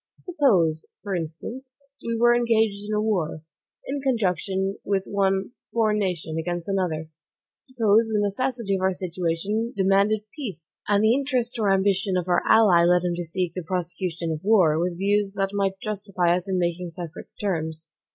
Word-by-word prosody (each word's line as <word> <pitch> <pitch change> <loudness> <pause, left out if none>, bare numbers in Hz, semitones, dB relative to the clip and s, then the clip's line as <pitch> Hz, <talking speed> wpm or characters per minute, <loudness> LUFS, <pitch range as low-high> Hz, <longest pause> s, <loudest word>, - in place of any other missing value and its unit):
Suppose, 195 - +2 0.2
for 200 -2 -3
instance, 190 - -5 0.3
we 230 0 -2
were 240 +1 +5
engaged 220 -4 +1
in 215 - 0
a - - +1
war, 180 -8 -1 0.4
in 275 +1 -3
conjunction 195 - 0
with 195 -1 0
one 195 +1 0 0.2
foreign 215 -2 +2
nation, 170 -5 -2
against 175 +1 -3
another. 170 -5 -2 0.5
Suppose 225 -3 +2
the 215 -1 0
necessity 220 +1 -1
of - - -6
our 190 0 +2
situation 185 +5 -2
demanded 200 +2 +3
peace, 200 - -6 0.2
and 205 0 +3
the 220 +1 +5
interest 255 -3 0
or 205 -3 +2
ambition 195 -1 +2
of 180 0 -2
our 175 - +3
ally 195 -7 +6
led 175 0 +4
him 175 -1 0
to 175 0 -3
seek 175 +1 -2
the 185 - -4
prosecution 175 -1 -3
of 155 -1 -4
the - - -10
war, 170 -8 +5
with 175 0 -1
views 200 +1 +1
that 195 0 0
might 195 -1 -1
justify 195 -4 0
us 180 +2 -4
in 190 - 0
making 175 0 -1
separate 170 -1 -8
terms. 160 -5 -2
195 Hz, 170 wpm, -24 LUFS, 175-215 Hz, 0.5 s, ally